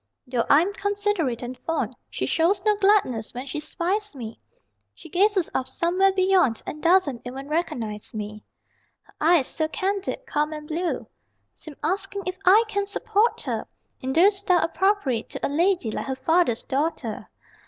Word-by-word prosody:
Though 245 -2 -1
I'm 340 +8 +5
considerate 405 - -1
and 245 +1 -6
fond, 325 - -2
She - - -3
shows 340 +5 +2
no 425 -1 +4
gladness 385 - +2
when 250 +2 -5
she 280 +2 -4
spies 360 +5 -2
me 230 -4 -8 0.6
She 330 - -13
gazes 380 +1 +3
off 260 - -1
somewhere 355 +8 +2
beyond 370 - +2
And 305 - -6
doesn't 335 -8 +3
even 265 +3 -7
recognize 235 -10 -3
me. 210 -1 -6 0.6
Her - - -24
eyes, 320 -3 +5
so 315 +3 -1
candid, 395 +8 -2
calm 300 -5 -1
and 300 -1 -8
blue, 340 +3 -2 0.5
Seem 310 -3 -11
asking 390 +4 -2
if 370 0 -4
I 405 +5 +7
can 405 -2 -1
support 440 +2 +1
her - - -3 0.3
In 260 - -2
the 350 +8 +6
style 390 -3 +2
appropriate 365 - 0
to - - -4
A - - -1
lady 335 - +1
like - - -4
her 265 - -2
father's 265 -2 +2
daughter. 270 -6 -2
335 Hz, 165 wpm, -24 LUFS, 265-390 Hz, 0.6 s, I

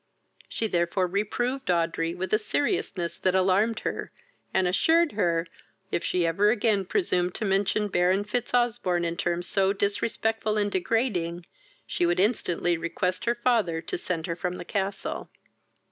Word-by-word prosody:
She 225 - -2
therefore 175 0 +1
reproved 240 +8 -2
Audrey 165 -1 +1
with 185 +2 -4
a 215 - +5
seriousness 210 - -1
that 185 0 +1
alarmed 195 +4 +2
her, - - -4 0.4
and 190 -1 +2
assured 325 - +3
her, 170 -5 +1 0.5
if - - -1
she 180 -2 +1
ever 195 +6 +3
again 215 -3 +2
presumed 180 - 0
to 220 - -2
mention 200 +2 +1
Baron 185 +1 +2
Fitzosbourne 235 -5 0
in 170 0 -2
terms 175 0 -1
so 195 +1 +2
disrespectful 215 +1 0
and 205 -1 +1
degrading, 180 -4 -1 0.4
she 175 - 0
would 175 +1 +1
instantly 175 -5 +1
request 180 +2 -2
her 235 0 +2
father 230 -9 +1
to 165 - -4
send 170 -2 -2
her 170 - -2
from 180 +1 -3
the - - -7
castle. 195 +1 -3
190 Hz, 150 wpm, -27 LUFS, 175-215 Hz, 0.5 s, a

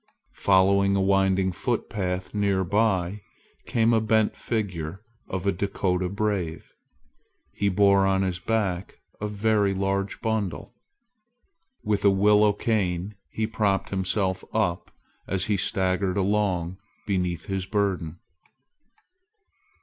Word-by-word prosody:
Following 100 +1 +4
a - - +2
winding 95 -1 +2
footpath 95 -4 -3
near 100 -2 +1
by, 100 -1 0 0.5
came 115 -2 +2
a 110 - +3
bent 110 -1 +2
figure 95 -5 -4 0.2
of 95 -1 -4
a 100 - +3
Dakota 90 -1 -1
brave. 100 -5 -3 0.8
He 100 - 0
bore 100 0 +4
on 95 0 +2
his 90 -2 -2
back 100 -2 -2 0.2
a 105 - -1
very 105 -1 +1
large 95 0 -1
bundle. 110 -5 -2 1.1
With 105 -1 0
a 100 - +6
willow 105 +2 +4
cane 100 -3 -1 0.2
he 110 - -2
propped 105 -3 0
himself 95 0 -1
up 95 -6 0 0.4
as 95 0 0
he 105 - +1
staggered 95 0 0
along 95 -3 0 0.3
beneath 90 -4 -1
his 95 -1 -3
burden. 95 -5 -1
100 Hz, 115 wpm, -25 LUFS, 95-105 Hz, 1.1 s, a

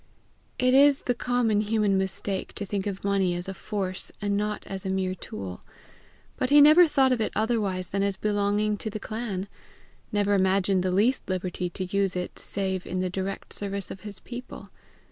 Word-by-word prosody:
It 255 0 +3
is 280 +1 +6
the 245 - +1
common 240 -3 +1
human 210 -2 +1
mistake 190 0 -2
to 205 - -4
think 200 0 -2
of 195 -1 -4
money 195 -3 +1
as 175 +2 -3
a 195 - -4
force 190 -1 -4
and 205 0 0
not 210 +1 -1
as 195 -1 -6
a 190 - -3
mere 190 -1 0
tool. 100 - -7 0.8
But 255 - 0
he 290 +1 +7
never 310 +4 +8
thought 270 -4 +3
of 245 -3 +1
it 215 - 0
otherwise 210 -5 0
than 195 - -1
as 200 -1 0
belonging 210 +1 +1
to 220 - -4
the 215 0 -5
clan; 210 -3 -4 0.6
never 205 -1 +2
imagined 190 0 +3
the 185 - 0
least 210 +8 +2
liberty 180 -1 -2
to 185 - -4
use 195 0 0
it 180 0 -4
save 190 -2 -3
in 185 0 -2
the 185 -1 -1
direct 190 +1 -3
service 200 -1 -3
of 190 - -7
his 205 -1 -7
people. 250 +1 -9
200 Hz, 190 wpm, -27 LUFS, 190-215 Hz, 0.8 s, never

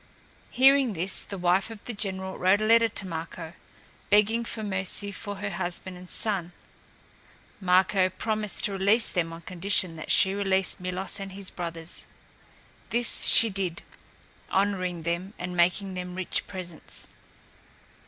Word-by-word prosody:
Hearing 265 -2 +4
this, 185 +2 -1
the 200 - -7
wife 180 +3 +1
of 225 -2 -11
the 240 - -5
general 190 -2 -3
wrote 190 +3 +4
a 215 - -1
letter 230 +1 +5
to 195 -2 -1
Marko, 165 -1 -6 0.6
begging 210 +3 +3
for 225 -1 -5
mercy 195 0 -1
for 205 +1 -6
her 200 +1 -4
husband 180 0 -3
and 180 0 -12
son. 190 -5 -1 1.1
Marko 185 0 +3
promised 215 +2 -1
to 205 - +2
release 200 +4 +5
them 165 -3 -1
on 165 0 -9
condition 180 -1 +1
that 155 - -8
she 190 - +4
release 195 -1 +1
Milos 185 +2 -3
and 195 -1 -7
his 195 -1 -3
brothers. 165 -1 -6 0.8
This 235 -1 +3
she 225 -1 +7
did, 185 -3 -3 0.7
honoring 185 -3 -1
them 175 +5 -3
and 180 0 -5
making 180 +3 +1
them 180 0 -6
rich 185 -1 0
presents. 180 -4 -7
190 Hz, 145 wpm, -26 LUFS, 180-205 Hz, 1.1 s, she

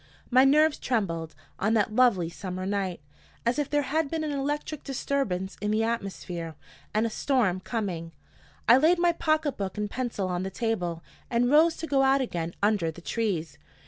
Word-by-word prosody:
My 255 +2 +6
nerves 300 +2 +4
trembled, 165 - -2 0.2
on 220 +3 +2
that 215 -1 +1
lovely 230 -9 +4
summer 185 +2 -5
night, 190 -4 -2 0.4
as 240 +5 +1
if 290 - -1
there 290 -1 +1
had 300 +2 0
been 320 0 -2
an 305 - -2
electric 290 +2 -3
disturbance 245 -9 -2
in 210 - -1
the 215 +1 +2
atmosphere 185 -7 -4 0.4
and 215 +2 +1
a - - 0
storm 215 -7 +1
coming. 185 -6 -4 0.6
I 235 +3 +8
laid 320 +6 +4
my 345 0 +4
pocket 310 -3 0
book 195 -1 -4
and 210 0 -1
pencil 240 -6 -2
on 180 -1 -2
the 190 - -3
table, 180 -6 -2 0.3
and 245 +1 +2
rose 320 +2 +5
to 325 - -4
go 275 -4 +2
out 270 +1 +4
again 170 -10 -3
under 205 -6 +2
the 160 - -8
trees. 170 -9 -2
225 Hz, 180 wpm, -27 LUFS, 185-275 Hz, 0.6 s, I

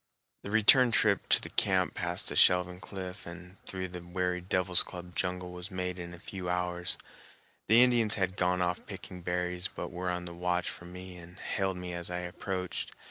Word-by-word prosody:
The - - -7
return 115 +4 +6
trip 105 -3 +3
to - - +6
the - - -9
camp 95 -5 +2
past 90 +3 -1
the - - -4
shelving 90 0 +5
cliff 95 0 -7
and 90 +2 -11
through 95 -1 -4
the 90 0 -7
weary 90 +1 -1
devil's 90 0 +2
club 90 0 -8
jungle 90 -1 -1
was 90 +1 -7
made 90 -1 -3
in 85 0 -6
a 85 - -9
few 90 0 -5
hours. 90 0 0 0.7
The 115 +4 +8
Indians 120 -4 +4
had 95 -2 0
gone 90 -1 +2
off 90 0 -1
picking 90 -1 -8
berries, 90 +1 -1
but - - -6
were 90 +1 -3
on 90 0 -2
the 85 - -7
watch 90 +1 0
for 85 - -10
me 90 +1 -9
and 85 +1 -12
hailed 95 -3 -1
me 90 0 -5
as 85 0 -4
I 90 - -2
approached. 90 +1 -4
90 Hz, 195 wpm, -31 LUFS, 90-95 Hz, 0.7 s, The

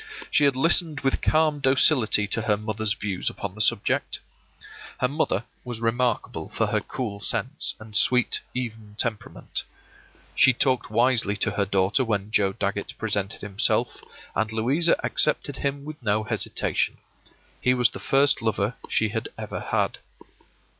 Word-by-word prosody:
She 150 - +4
had 140 -2 +3
listened 160 +1 +2
with 135 -1 0
calm 155 -1 +2
docility 130 -5 +4
to 115 - 0
her 105 -1 +1
mother's 110 0 -1
views 100 -2 -3
upon 100 -2 -6
the 110 - -4
subject. - - +1 0.8
Her 125 - +2
mother 140 - -1 0.2
was 120 -3 -6
remarkable 115 0 -1
for - - 0
her - - 0
cool 110 -6 -5
sense 115 +6 -2
and 110 -1 -11
sweet, 125 +2 +3 0.2
even 110 -4 -5
temperament. 115 -3 -3 0.7
She 130 - +5
talked 130 +1 0
wisely 115 -2 +2
to - - 0
her 100 - 0
daughter 95 +6 +2
when 105 -3 -2
Joe 100 -3 +2
Dagget 100 -1 -3
presented 105 -1 -1
himself, 100 -1 +1 0.3
and 110 +2 0
Louisa 135 +10 +2
accepted 145 -2 +1
him 140 0 -3
with 155 -1 -8
no 110 -2 0
hesitation. 110 - -1 0.6
He 125 0 +3
was 125 -2 +3
the - - -8
first 140 -1 +3
lover 110 0 0 0.2
she 110 - +1
had 110 +1 -4
ever - - -5
had. - - -1
115 Hz, 150 wpm, -25 LUFS, 105-130 Hz, 0.8 s, She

